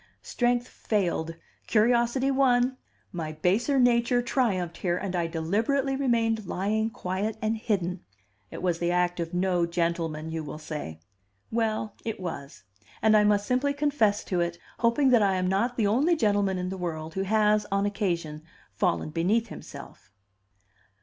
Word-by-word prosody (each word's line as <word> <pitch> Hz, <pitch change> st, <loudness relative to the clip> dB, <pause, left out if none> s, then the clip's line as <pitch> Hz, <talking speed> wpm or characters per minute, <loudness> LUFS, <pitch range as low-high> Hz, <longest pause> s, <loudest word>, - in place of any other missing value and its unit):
Strength 245 Hz, 0 st, 0 dB
failed, 170 Hz, -6 st, -2 dB, 0.3 s
curiosity 240 Hz, +4 st, +2 dB
won, 255 Hz, -1 st, +3 dB, 0.4 s
my 160 Hz, -3 st, -4 dB
baser 200 Hz, -, +1 dB
nature 245 Hz, -1 st, +3 dB
triumphed 190 Hz, -9 st, 0 dB
here, 175 Hz, -2 st, 0 dB
and 185 Hz, -1 st, -3 dB
I 170 Hz, -1 st, 0 dB
deliberately 220 Hz, -, 0 dB
remained 225 Hz, -6 st, +1 dB
lying 215 Hz, +5 st, 0 dB
quiet 205 Hz, 0 st, -3 dB
and 220 Hz, 0 st, 0 dB
hidden. 195 Hz, -6 st, -2 dB, 0.5 s
It -, -, -8 dB
was 175 Hz, -2 st, 0 dB
the 175 Hz, -, 0 dB
act 175 Hz, 0 st, +1 dB
of 170 Hz, +1 st, -3 dB
no 180 Hz, -1 st, +1 dB
gentleman, 165 Hz, -2 st, -2 dB
you 160 Hz, -1 st, -3 dB
will 150 Hz, 0 st, -7 dB
say. 150 Hz, -, -7 dB, 0.5 s
Well, 220 Hz, -2 st, -1 dB
it 225 Hz, -3 st, -4 dB
was; 140 Hz, -, -7 dB, 0.4 s
and 220 Hz, 0 st, +5 dB
I 210 Hz, -, +6 dB
must 205 Hz, -1 st, +3 dB
simply 255 Hz, +4 st, +1 dB
confess 280 Hz, -9 st, +1 dB
to 180 Hz, -, -2 dB
it, 170 Hz, 0 st, -1 dB, 0.2 s
hoping 240 Hz, +4 st, +3 dB
that 240 Hz, -3 st, +5 dB
I 195 Hz, -2 st, +3 dB
am 185 Hz, 0 st, 0 dB
not 205 Hz, +7 st, 0 dB
the 220 Hz, -, +2 dB
only 270 Hz, +12 st, +3 dB
gentleman 205 Hz, -, +1 dB
in 180 Hz, 0 st, -3 dB
the 190 Hz, -, -5 dB
world 160 Hz, -2 st, -4 dB
who 190 Hz, -, -2 dB
has, 210 Hz, +1 st, +2 dB
on 200 Hz, 0 st, +1 dB
occasion, 170 Hz, -7 st, -2 dB, 0.3 s
fallen 175 Hz, -5 st, 0 dB
beneath 205 Hz, +9 st, +1 dB
himself. 140 Hz, -6 st, -11 dB
200 Hz, 155 wpm, -27 LUFS, 175-235 Hz, 0.5 s, I